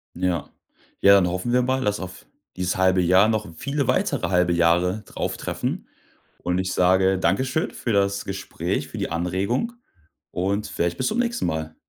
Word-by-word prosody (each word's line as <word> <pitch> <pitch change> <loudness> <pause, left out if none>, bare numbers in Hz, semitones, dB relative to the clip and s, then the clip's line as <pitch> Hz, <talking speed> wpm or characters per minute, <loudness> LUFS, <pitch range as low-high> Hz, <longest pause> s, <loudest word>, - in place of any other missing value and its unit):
Ja. 90 -2 -1 0.5
Ja, 100 - +7
dann 95 -3 +4
hoffen 90 +7 -2
wir 125 - +4
mal, 130 +1 0
dass 105 0 0
auf 95 0 -8 0.3
dieses 90 0 -1
halbe 95 0 +3
Jahr 95 +4 +5
noch 110 -1 -1
viele 140 - -2
weitere - - +1
halbe 90 -1 +2
Jahre 90 +4 +2
drauftreffen. - - -4 0.5
Und 90 +1 -1
ich 95 0 -1
sage 95 +1 +3
Dankeschön 130 +9 0
für 120 - -3
das 100 0 +1
Gespräch, 95 0 -3
für - - -7
die - - -2
Anregung 95 - -1 0.6
und 100 +3 -1
vielleicht 85 0 -1
bis 130 - 0
zum 225 - -2
nächsten 235 -1 0
Mal. 80 -1 -3
95 Hz, 165 wpm, -23 LUFS, 90-110 Hz, 0.6 s, Ja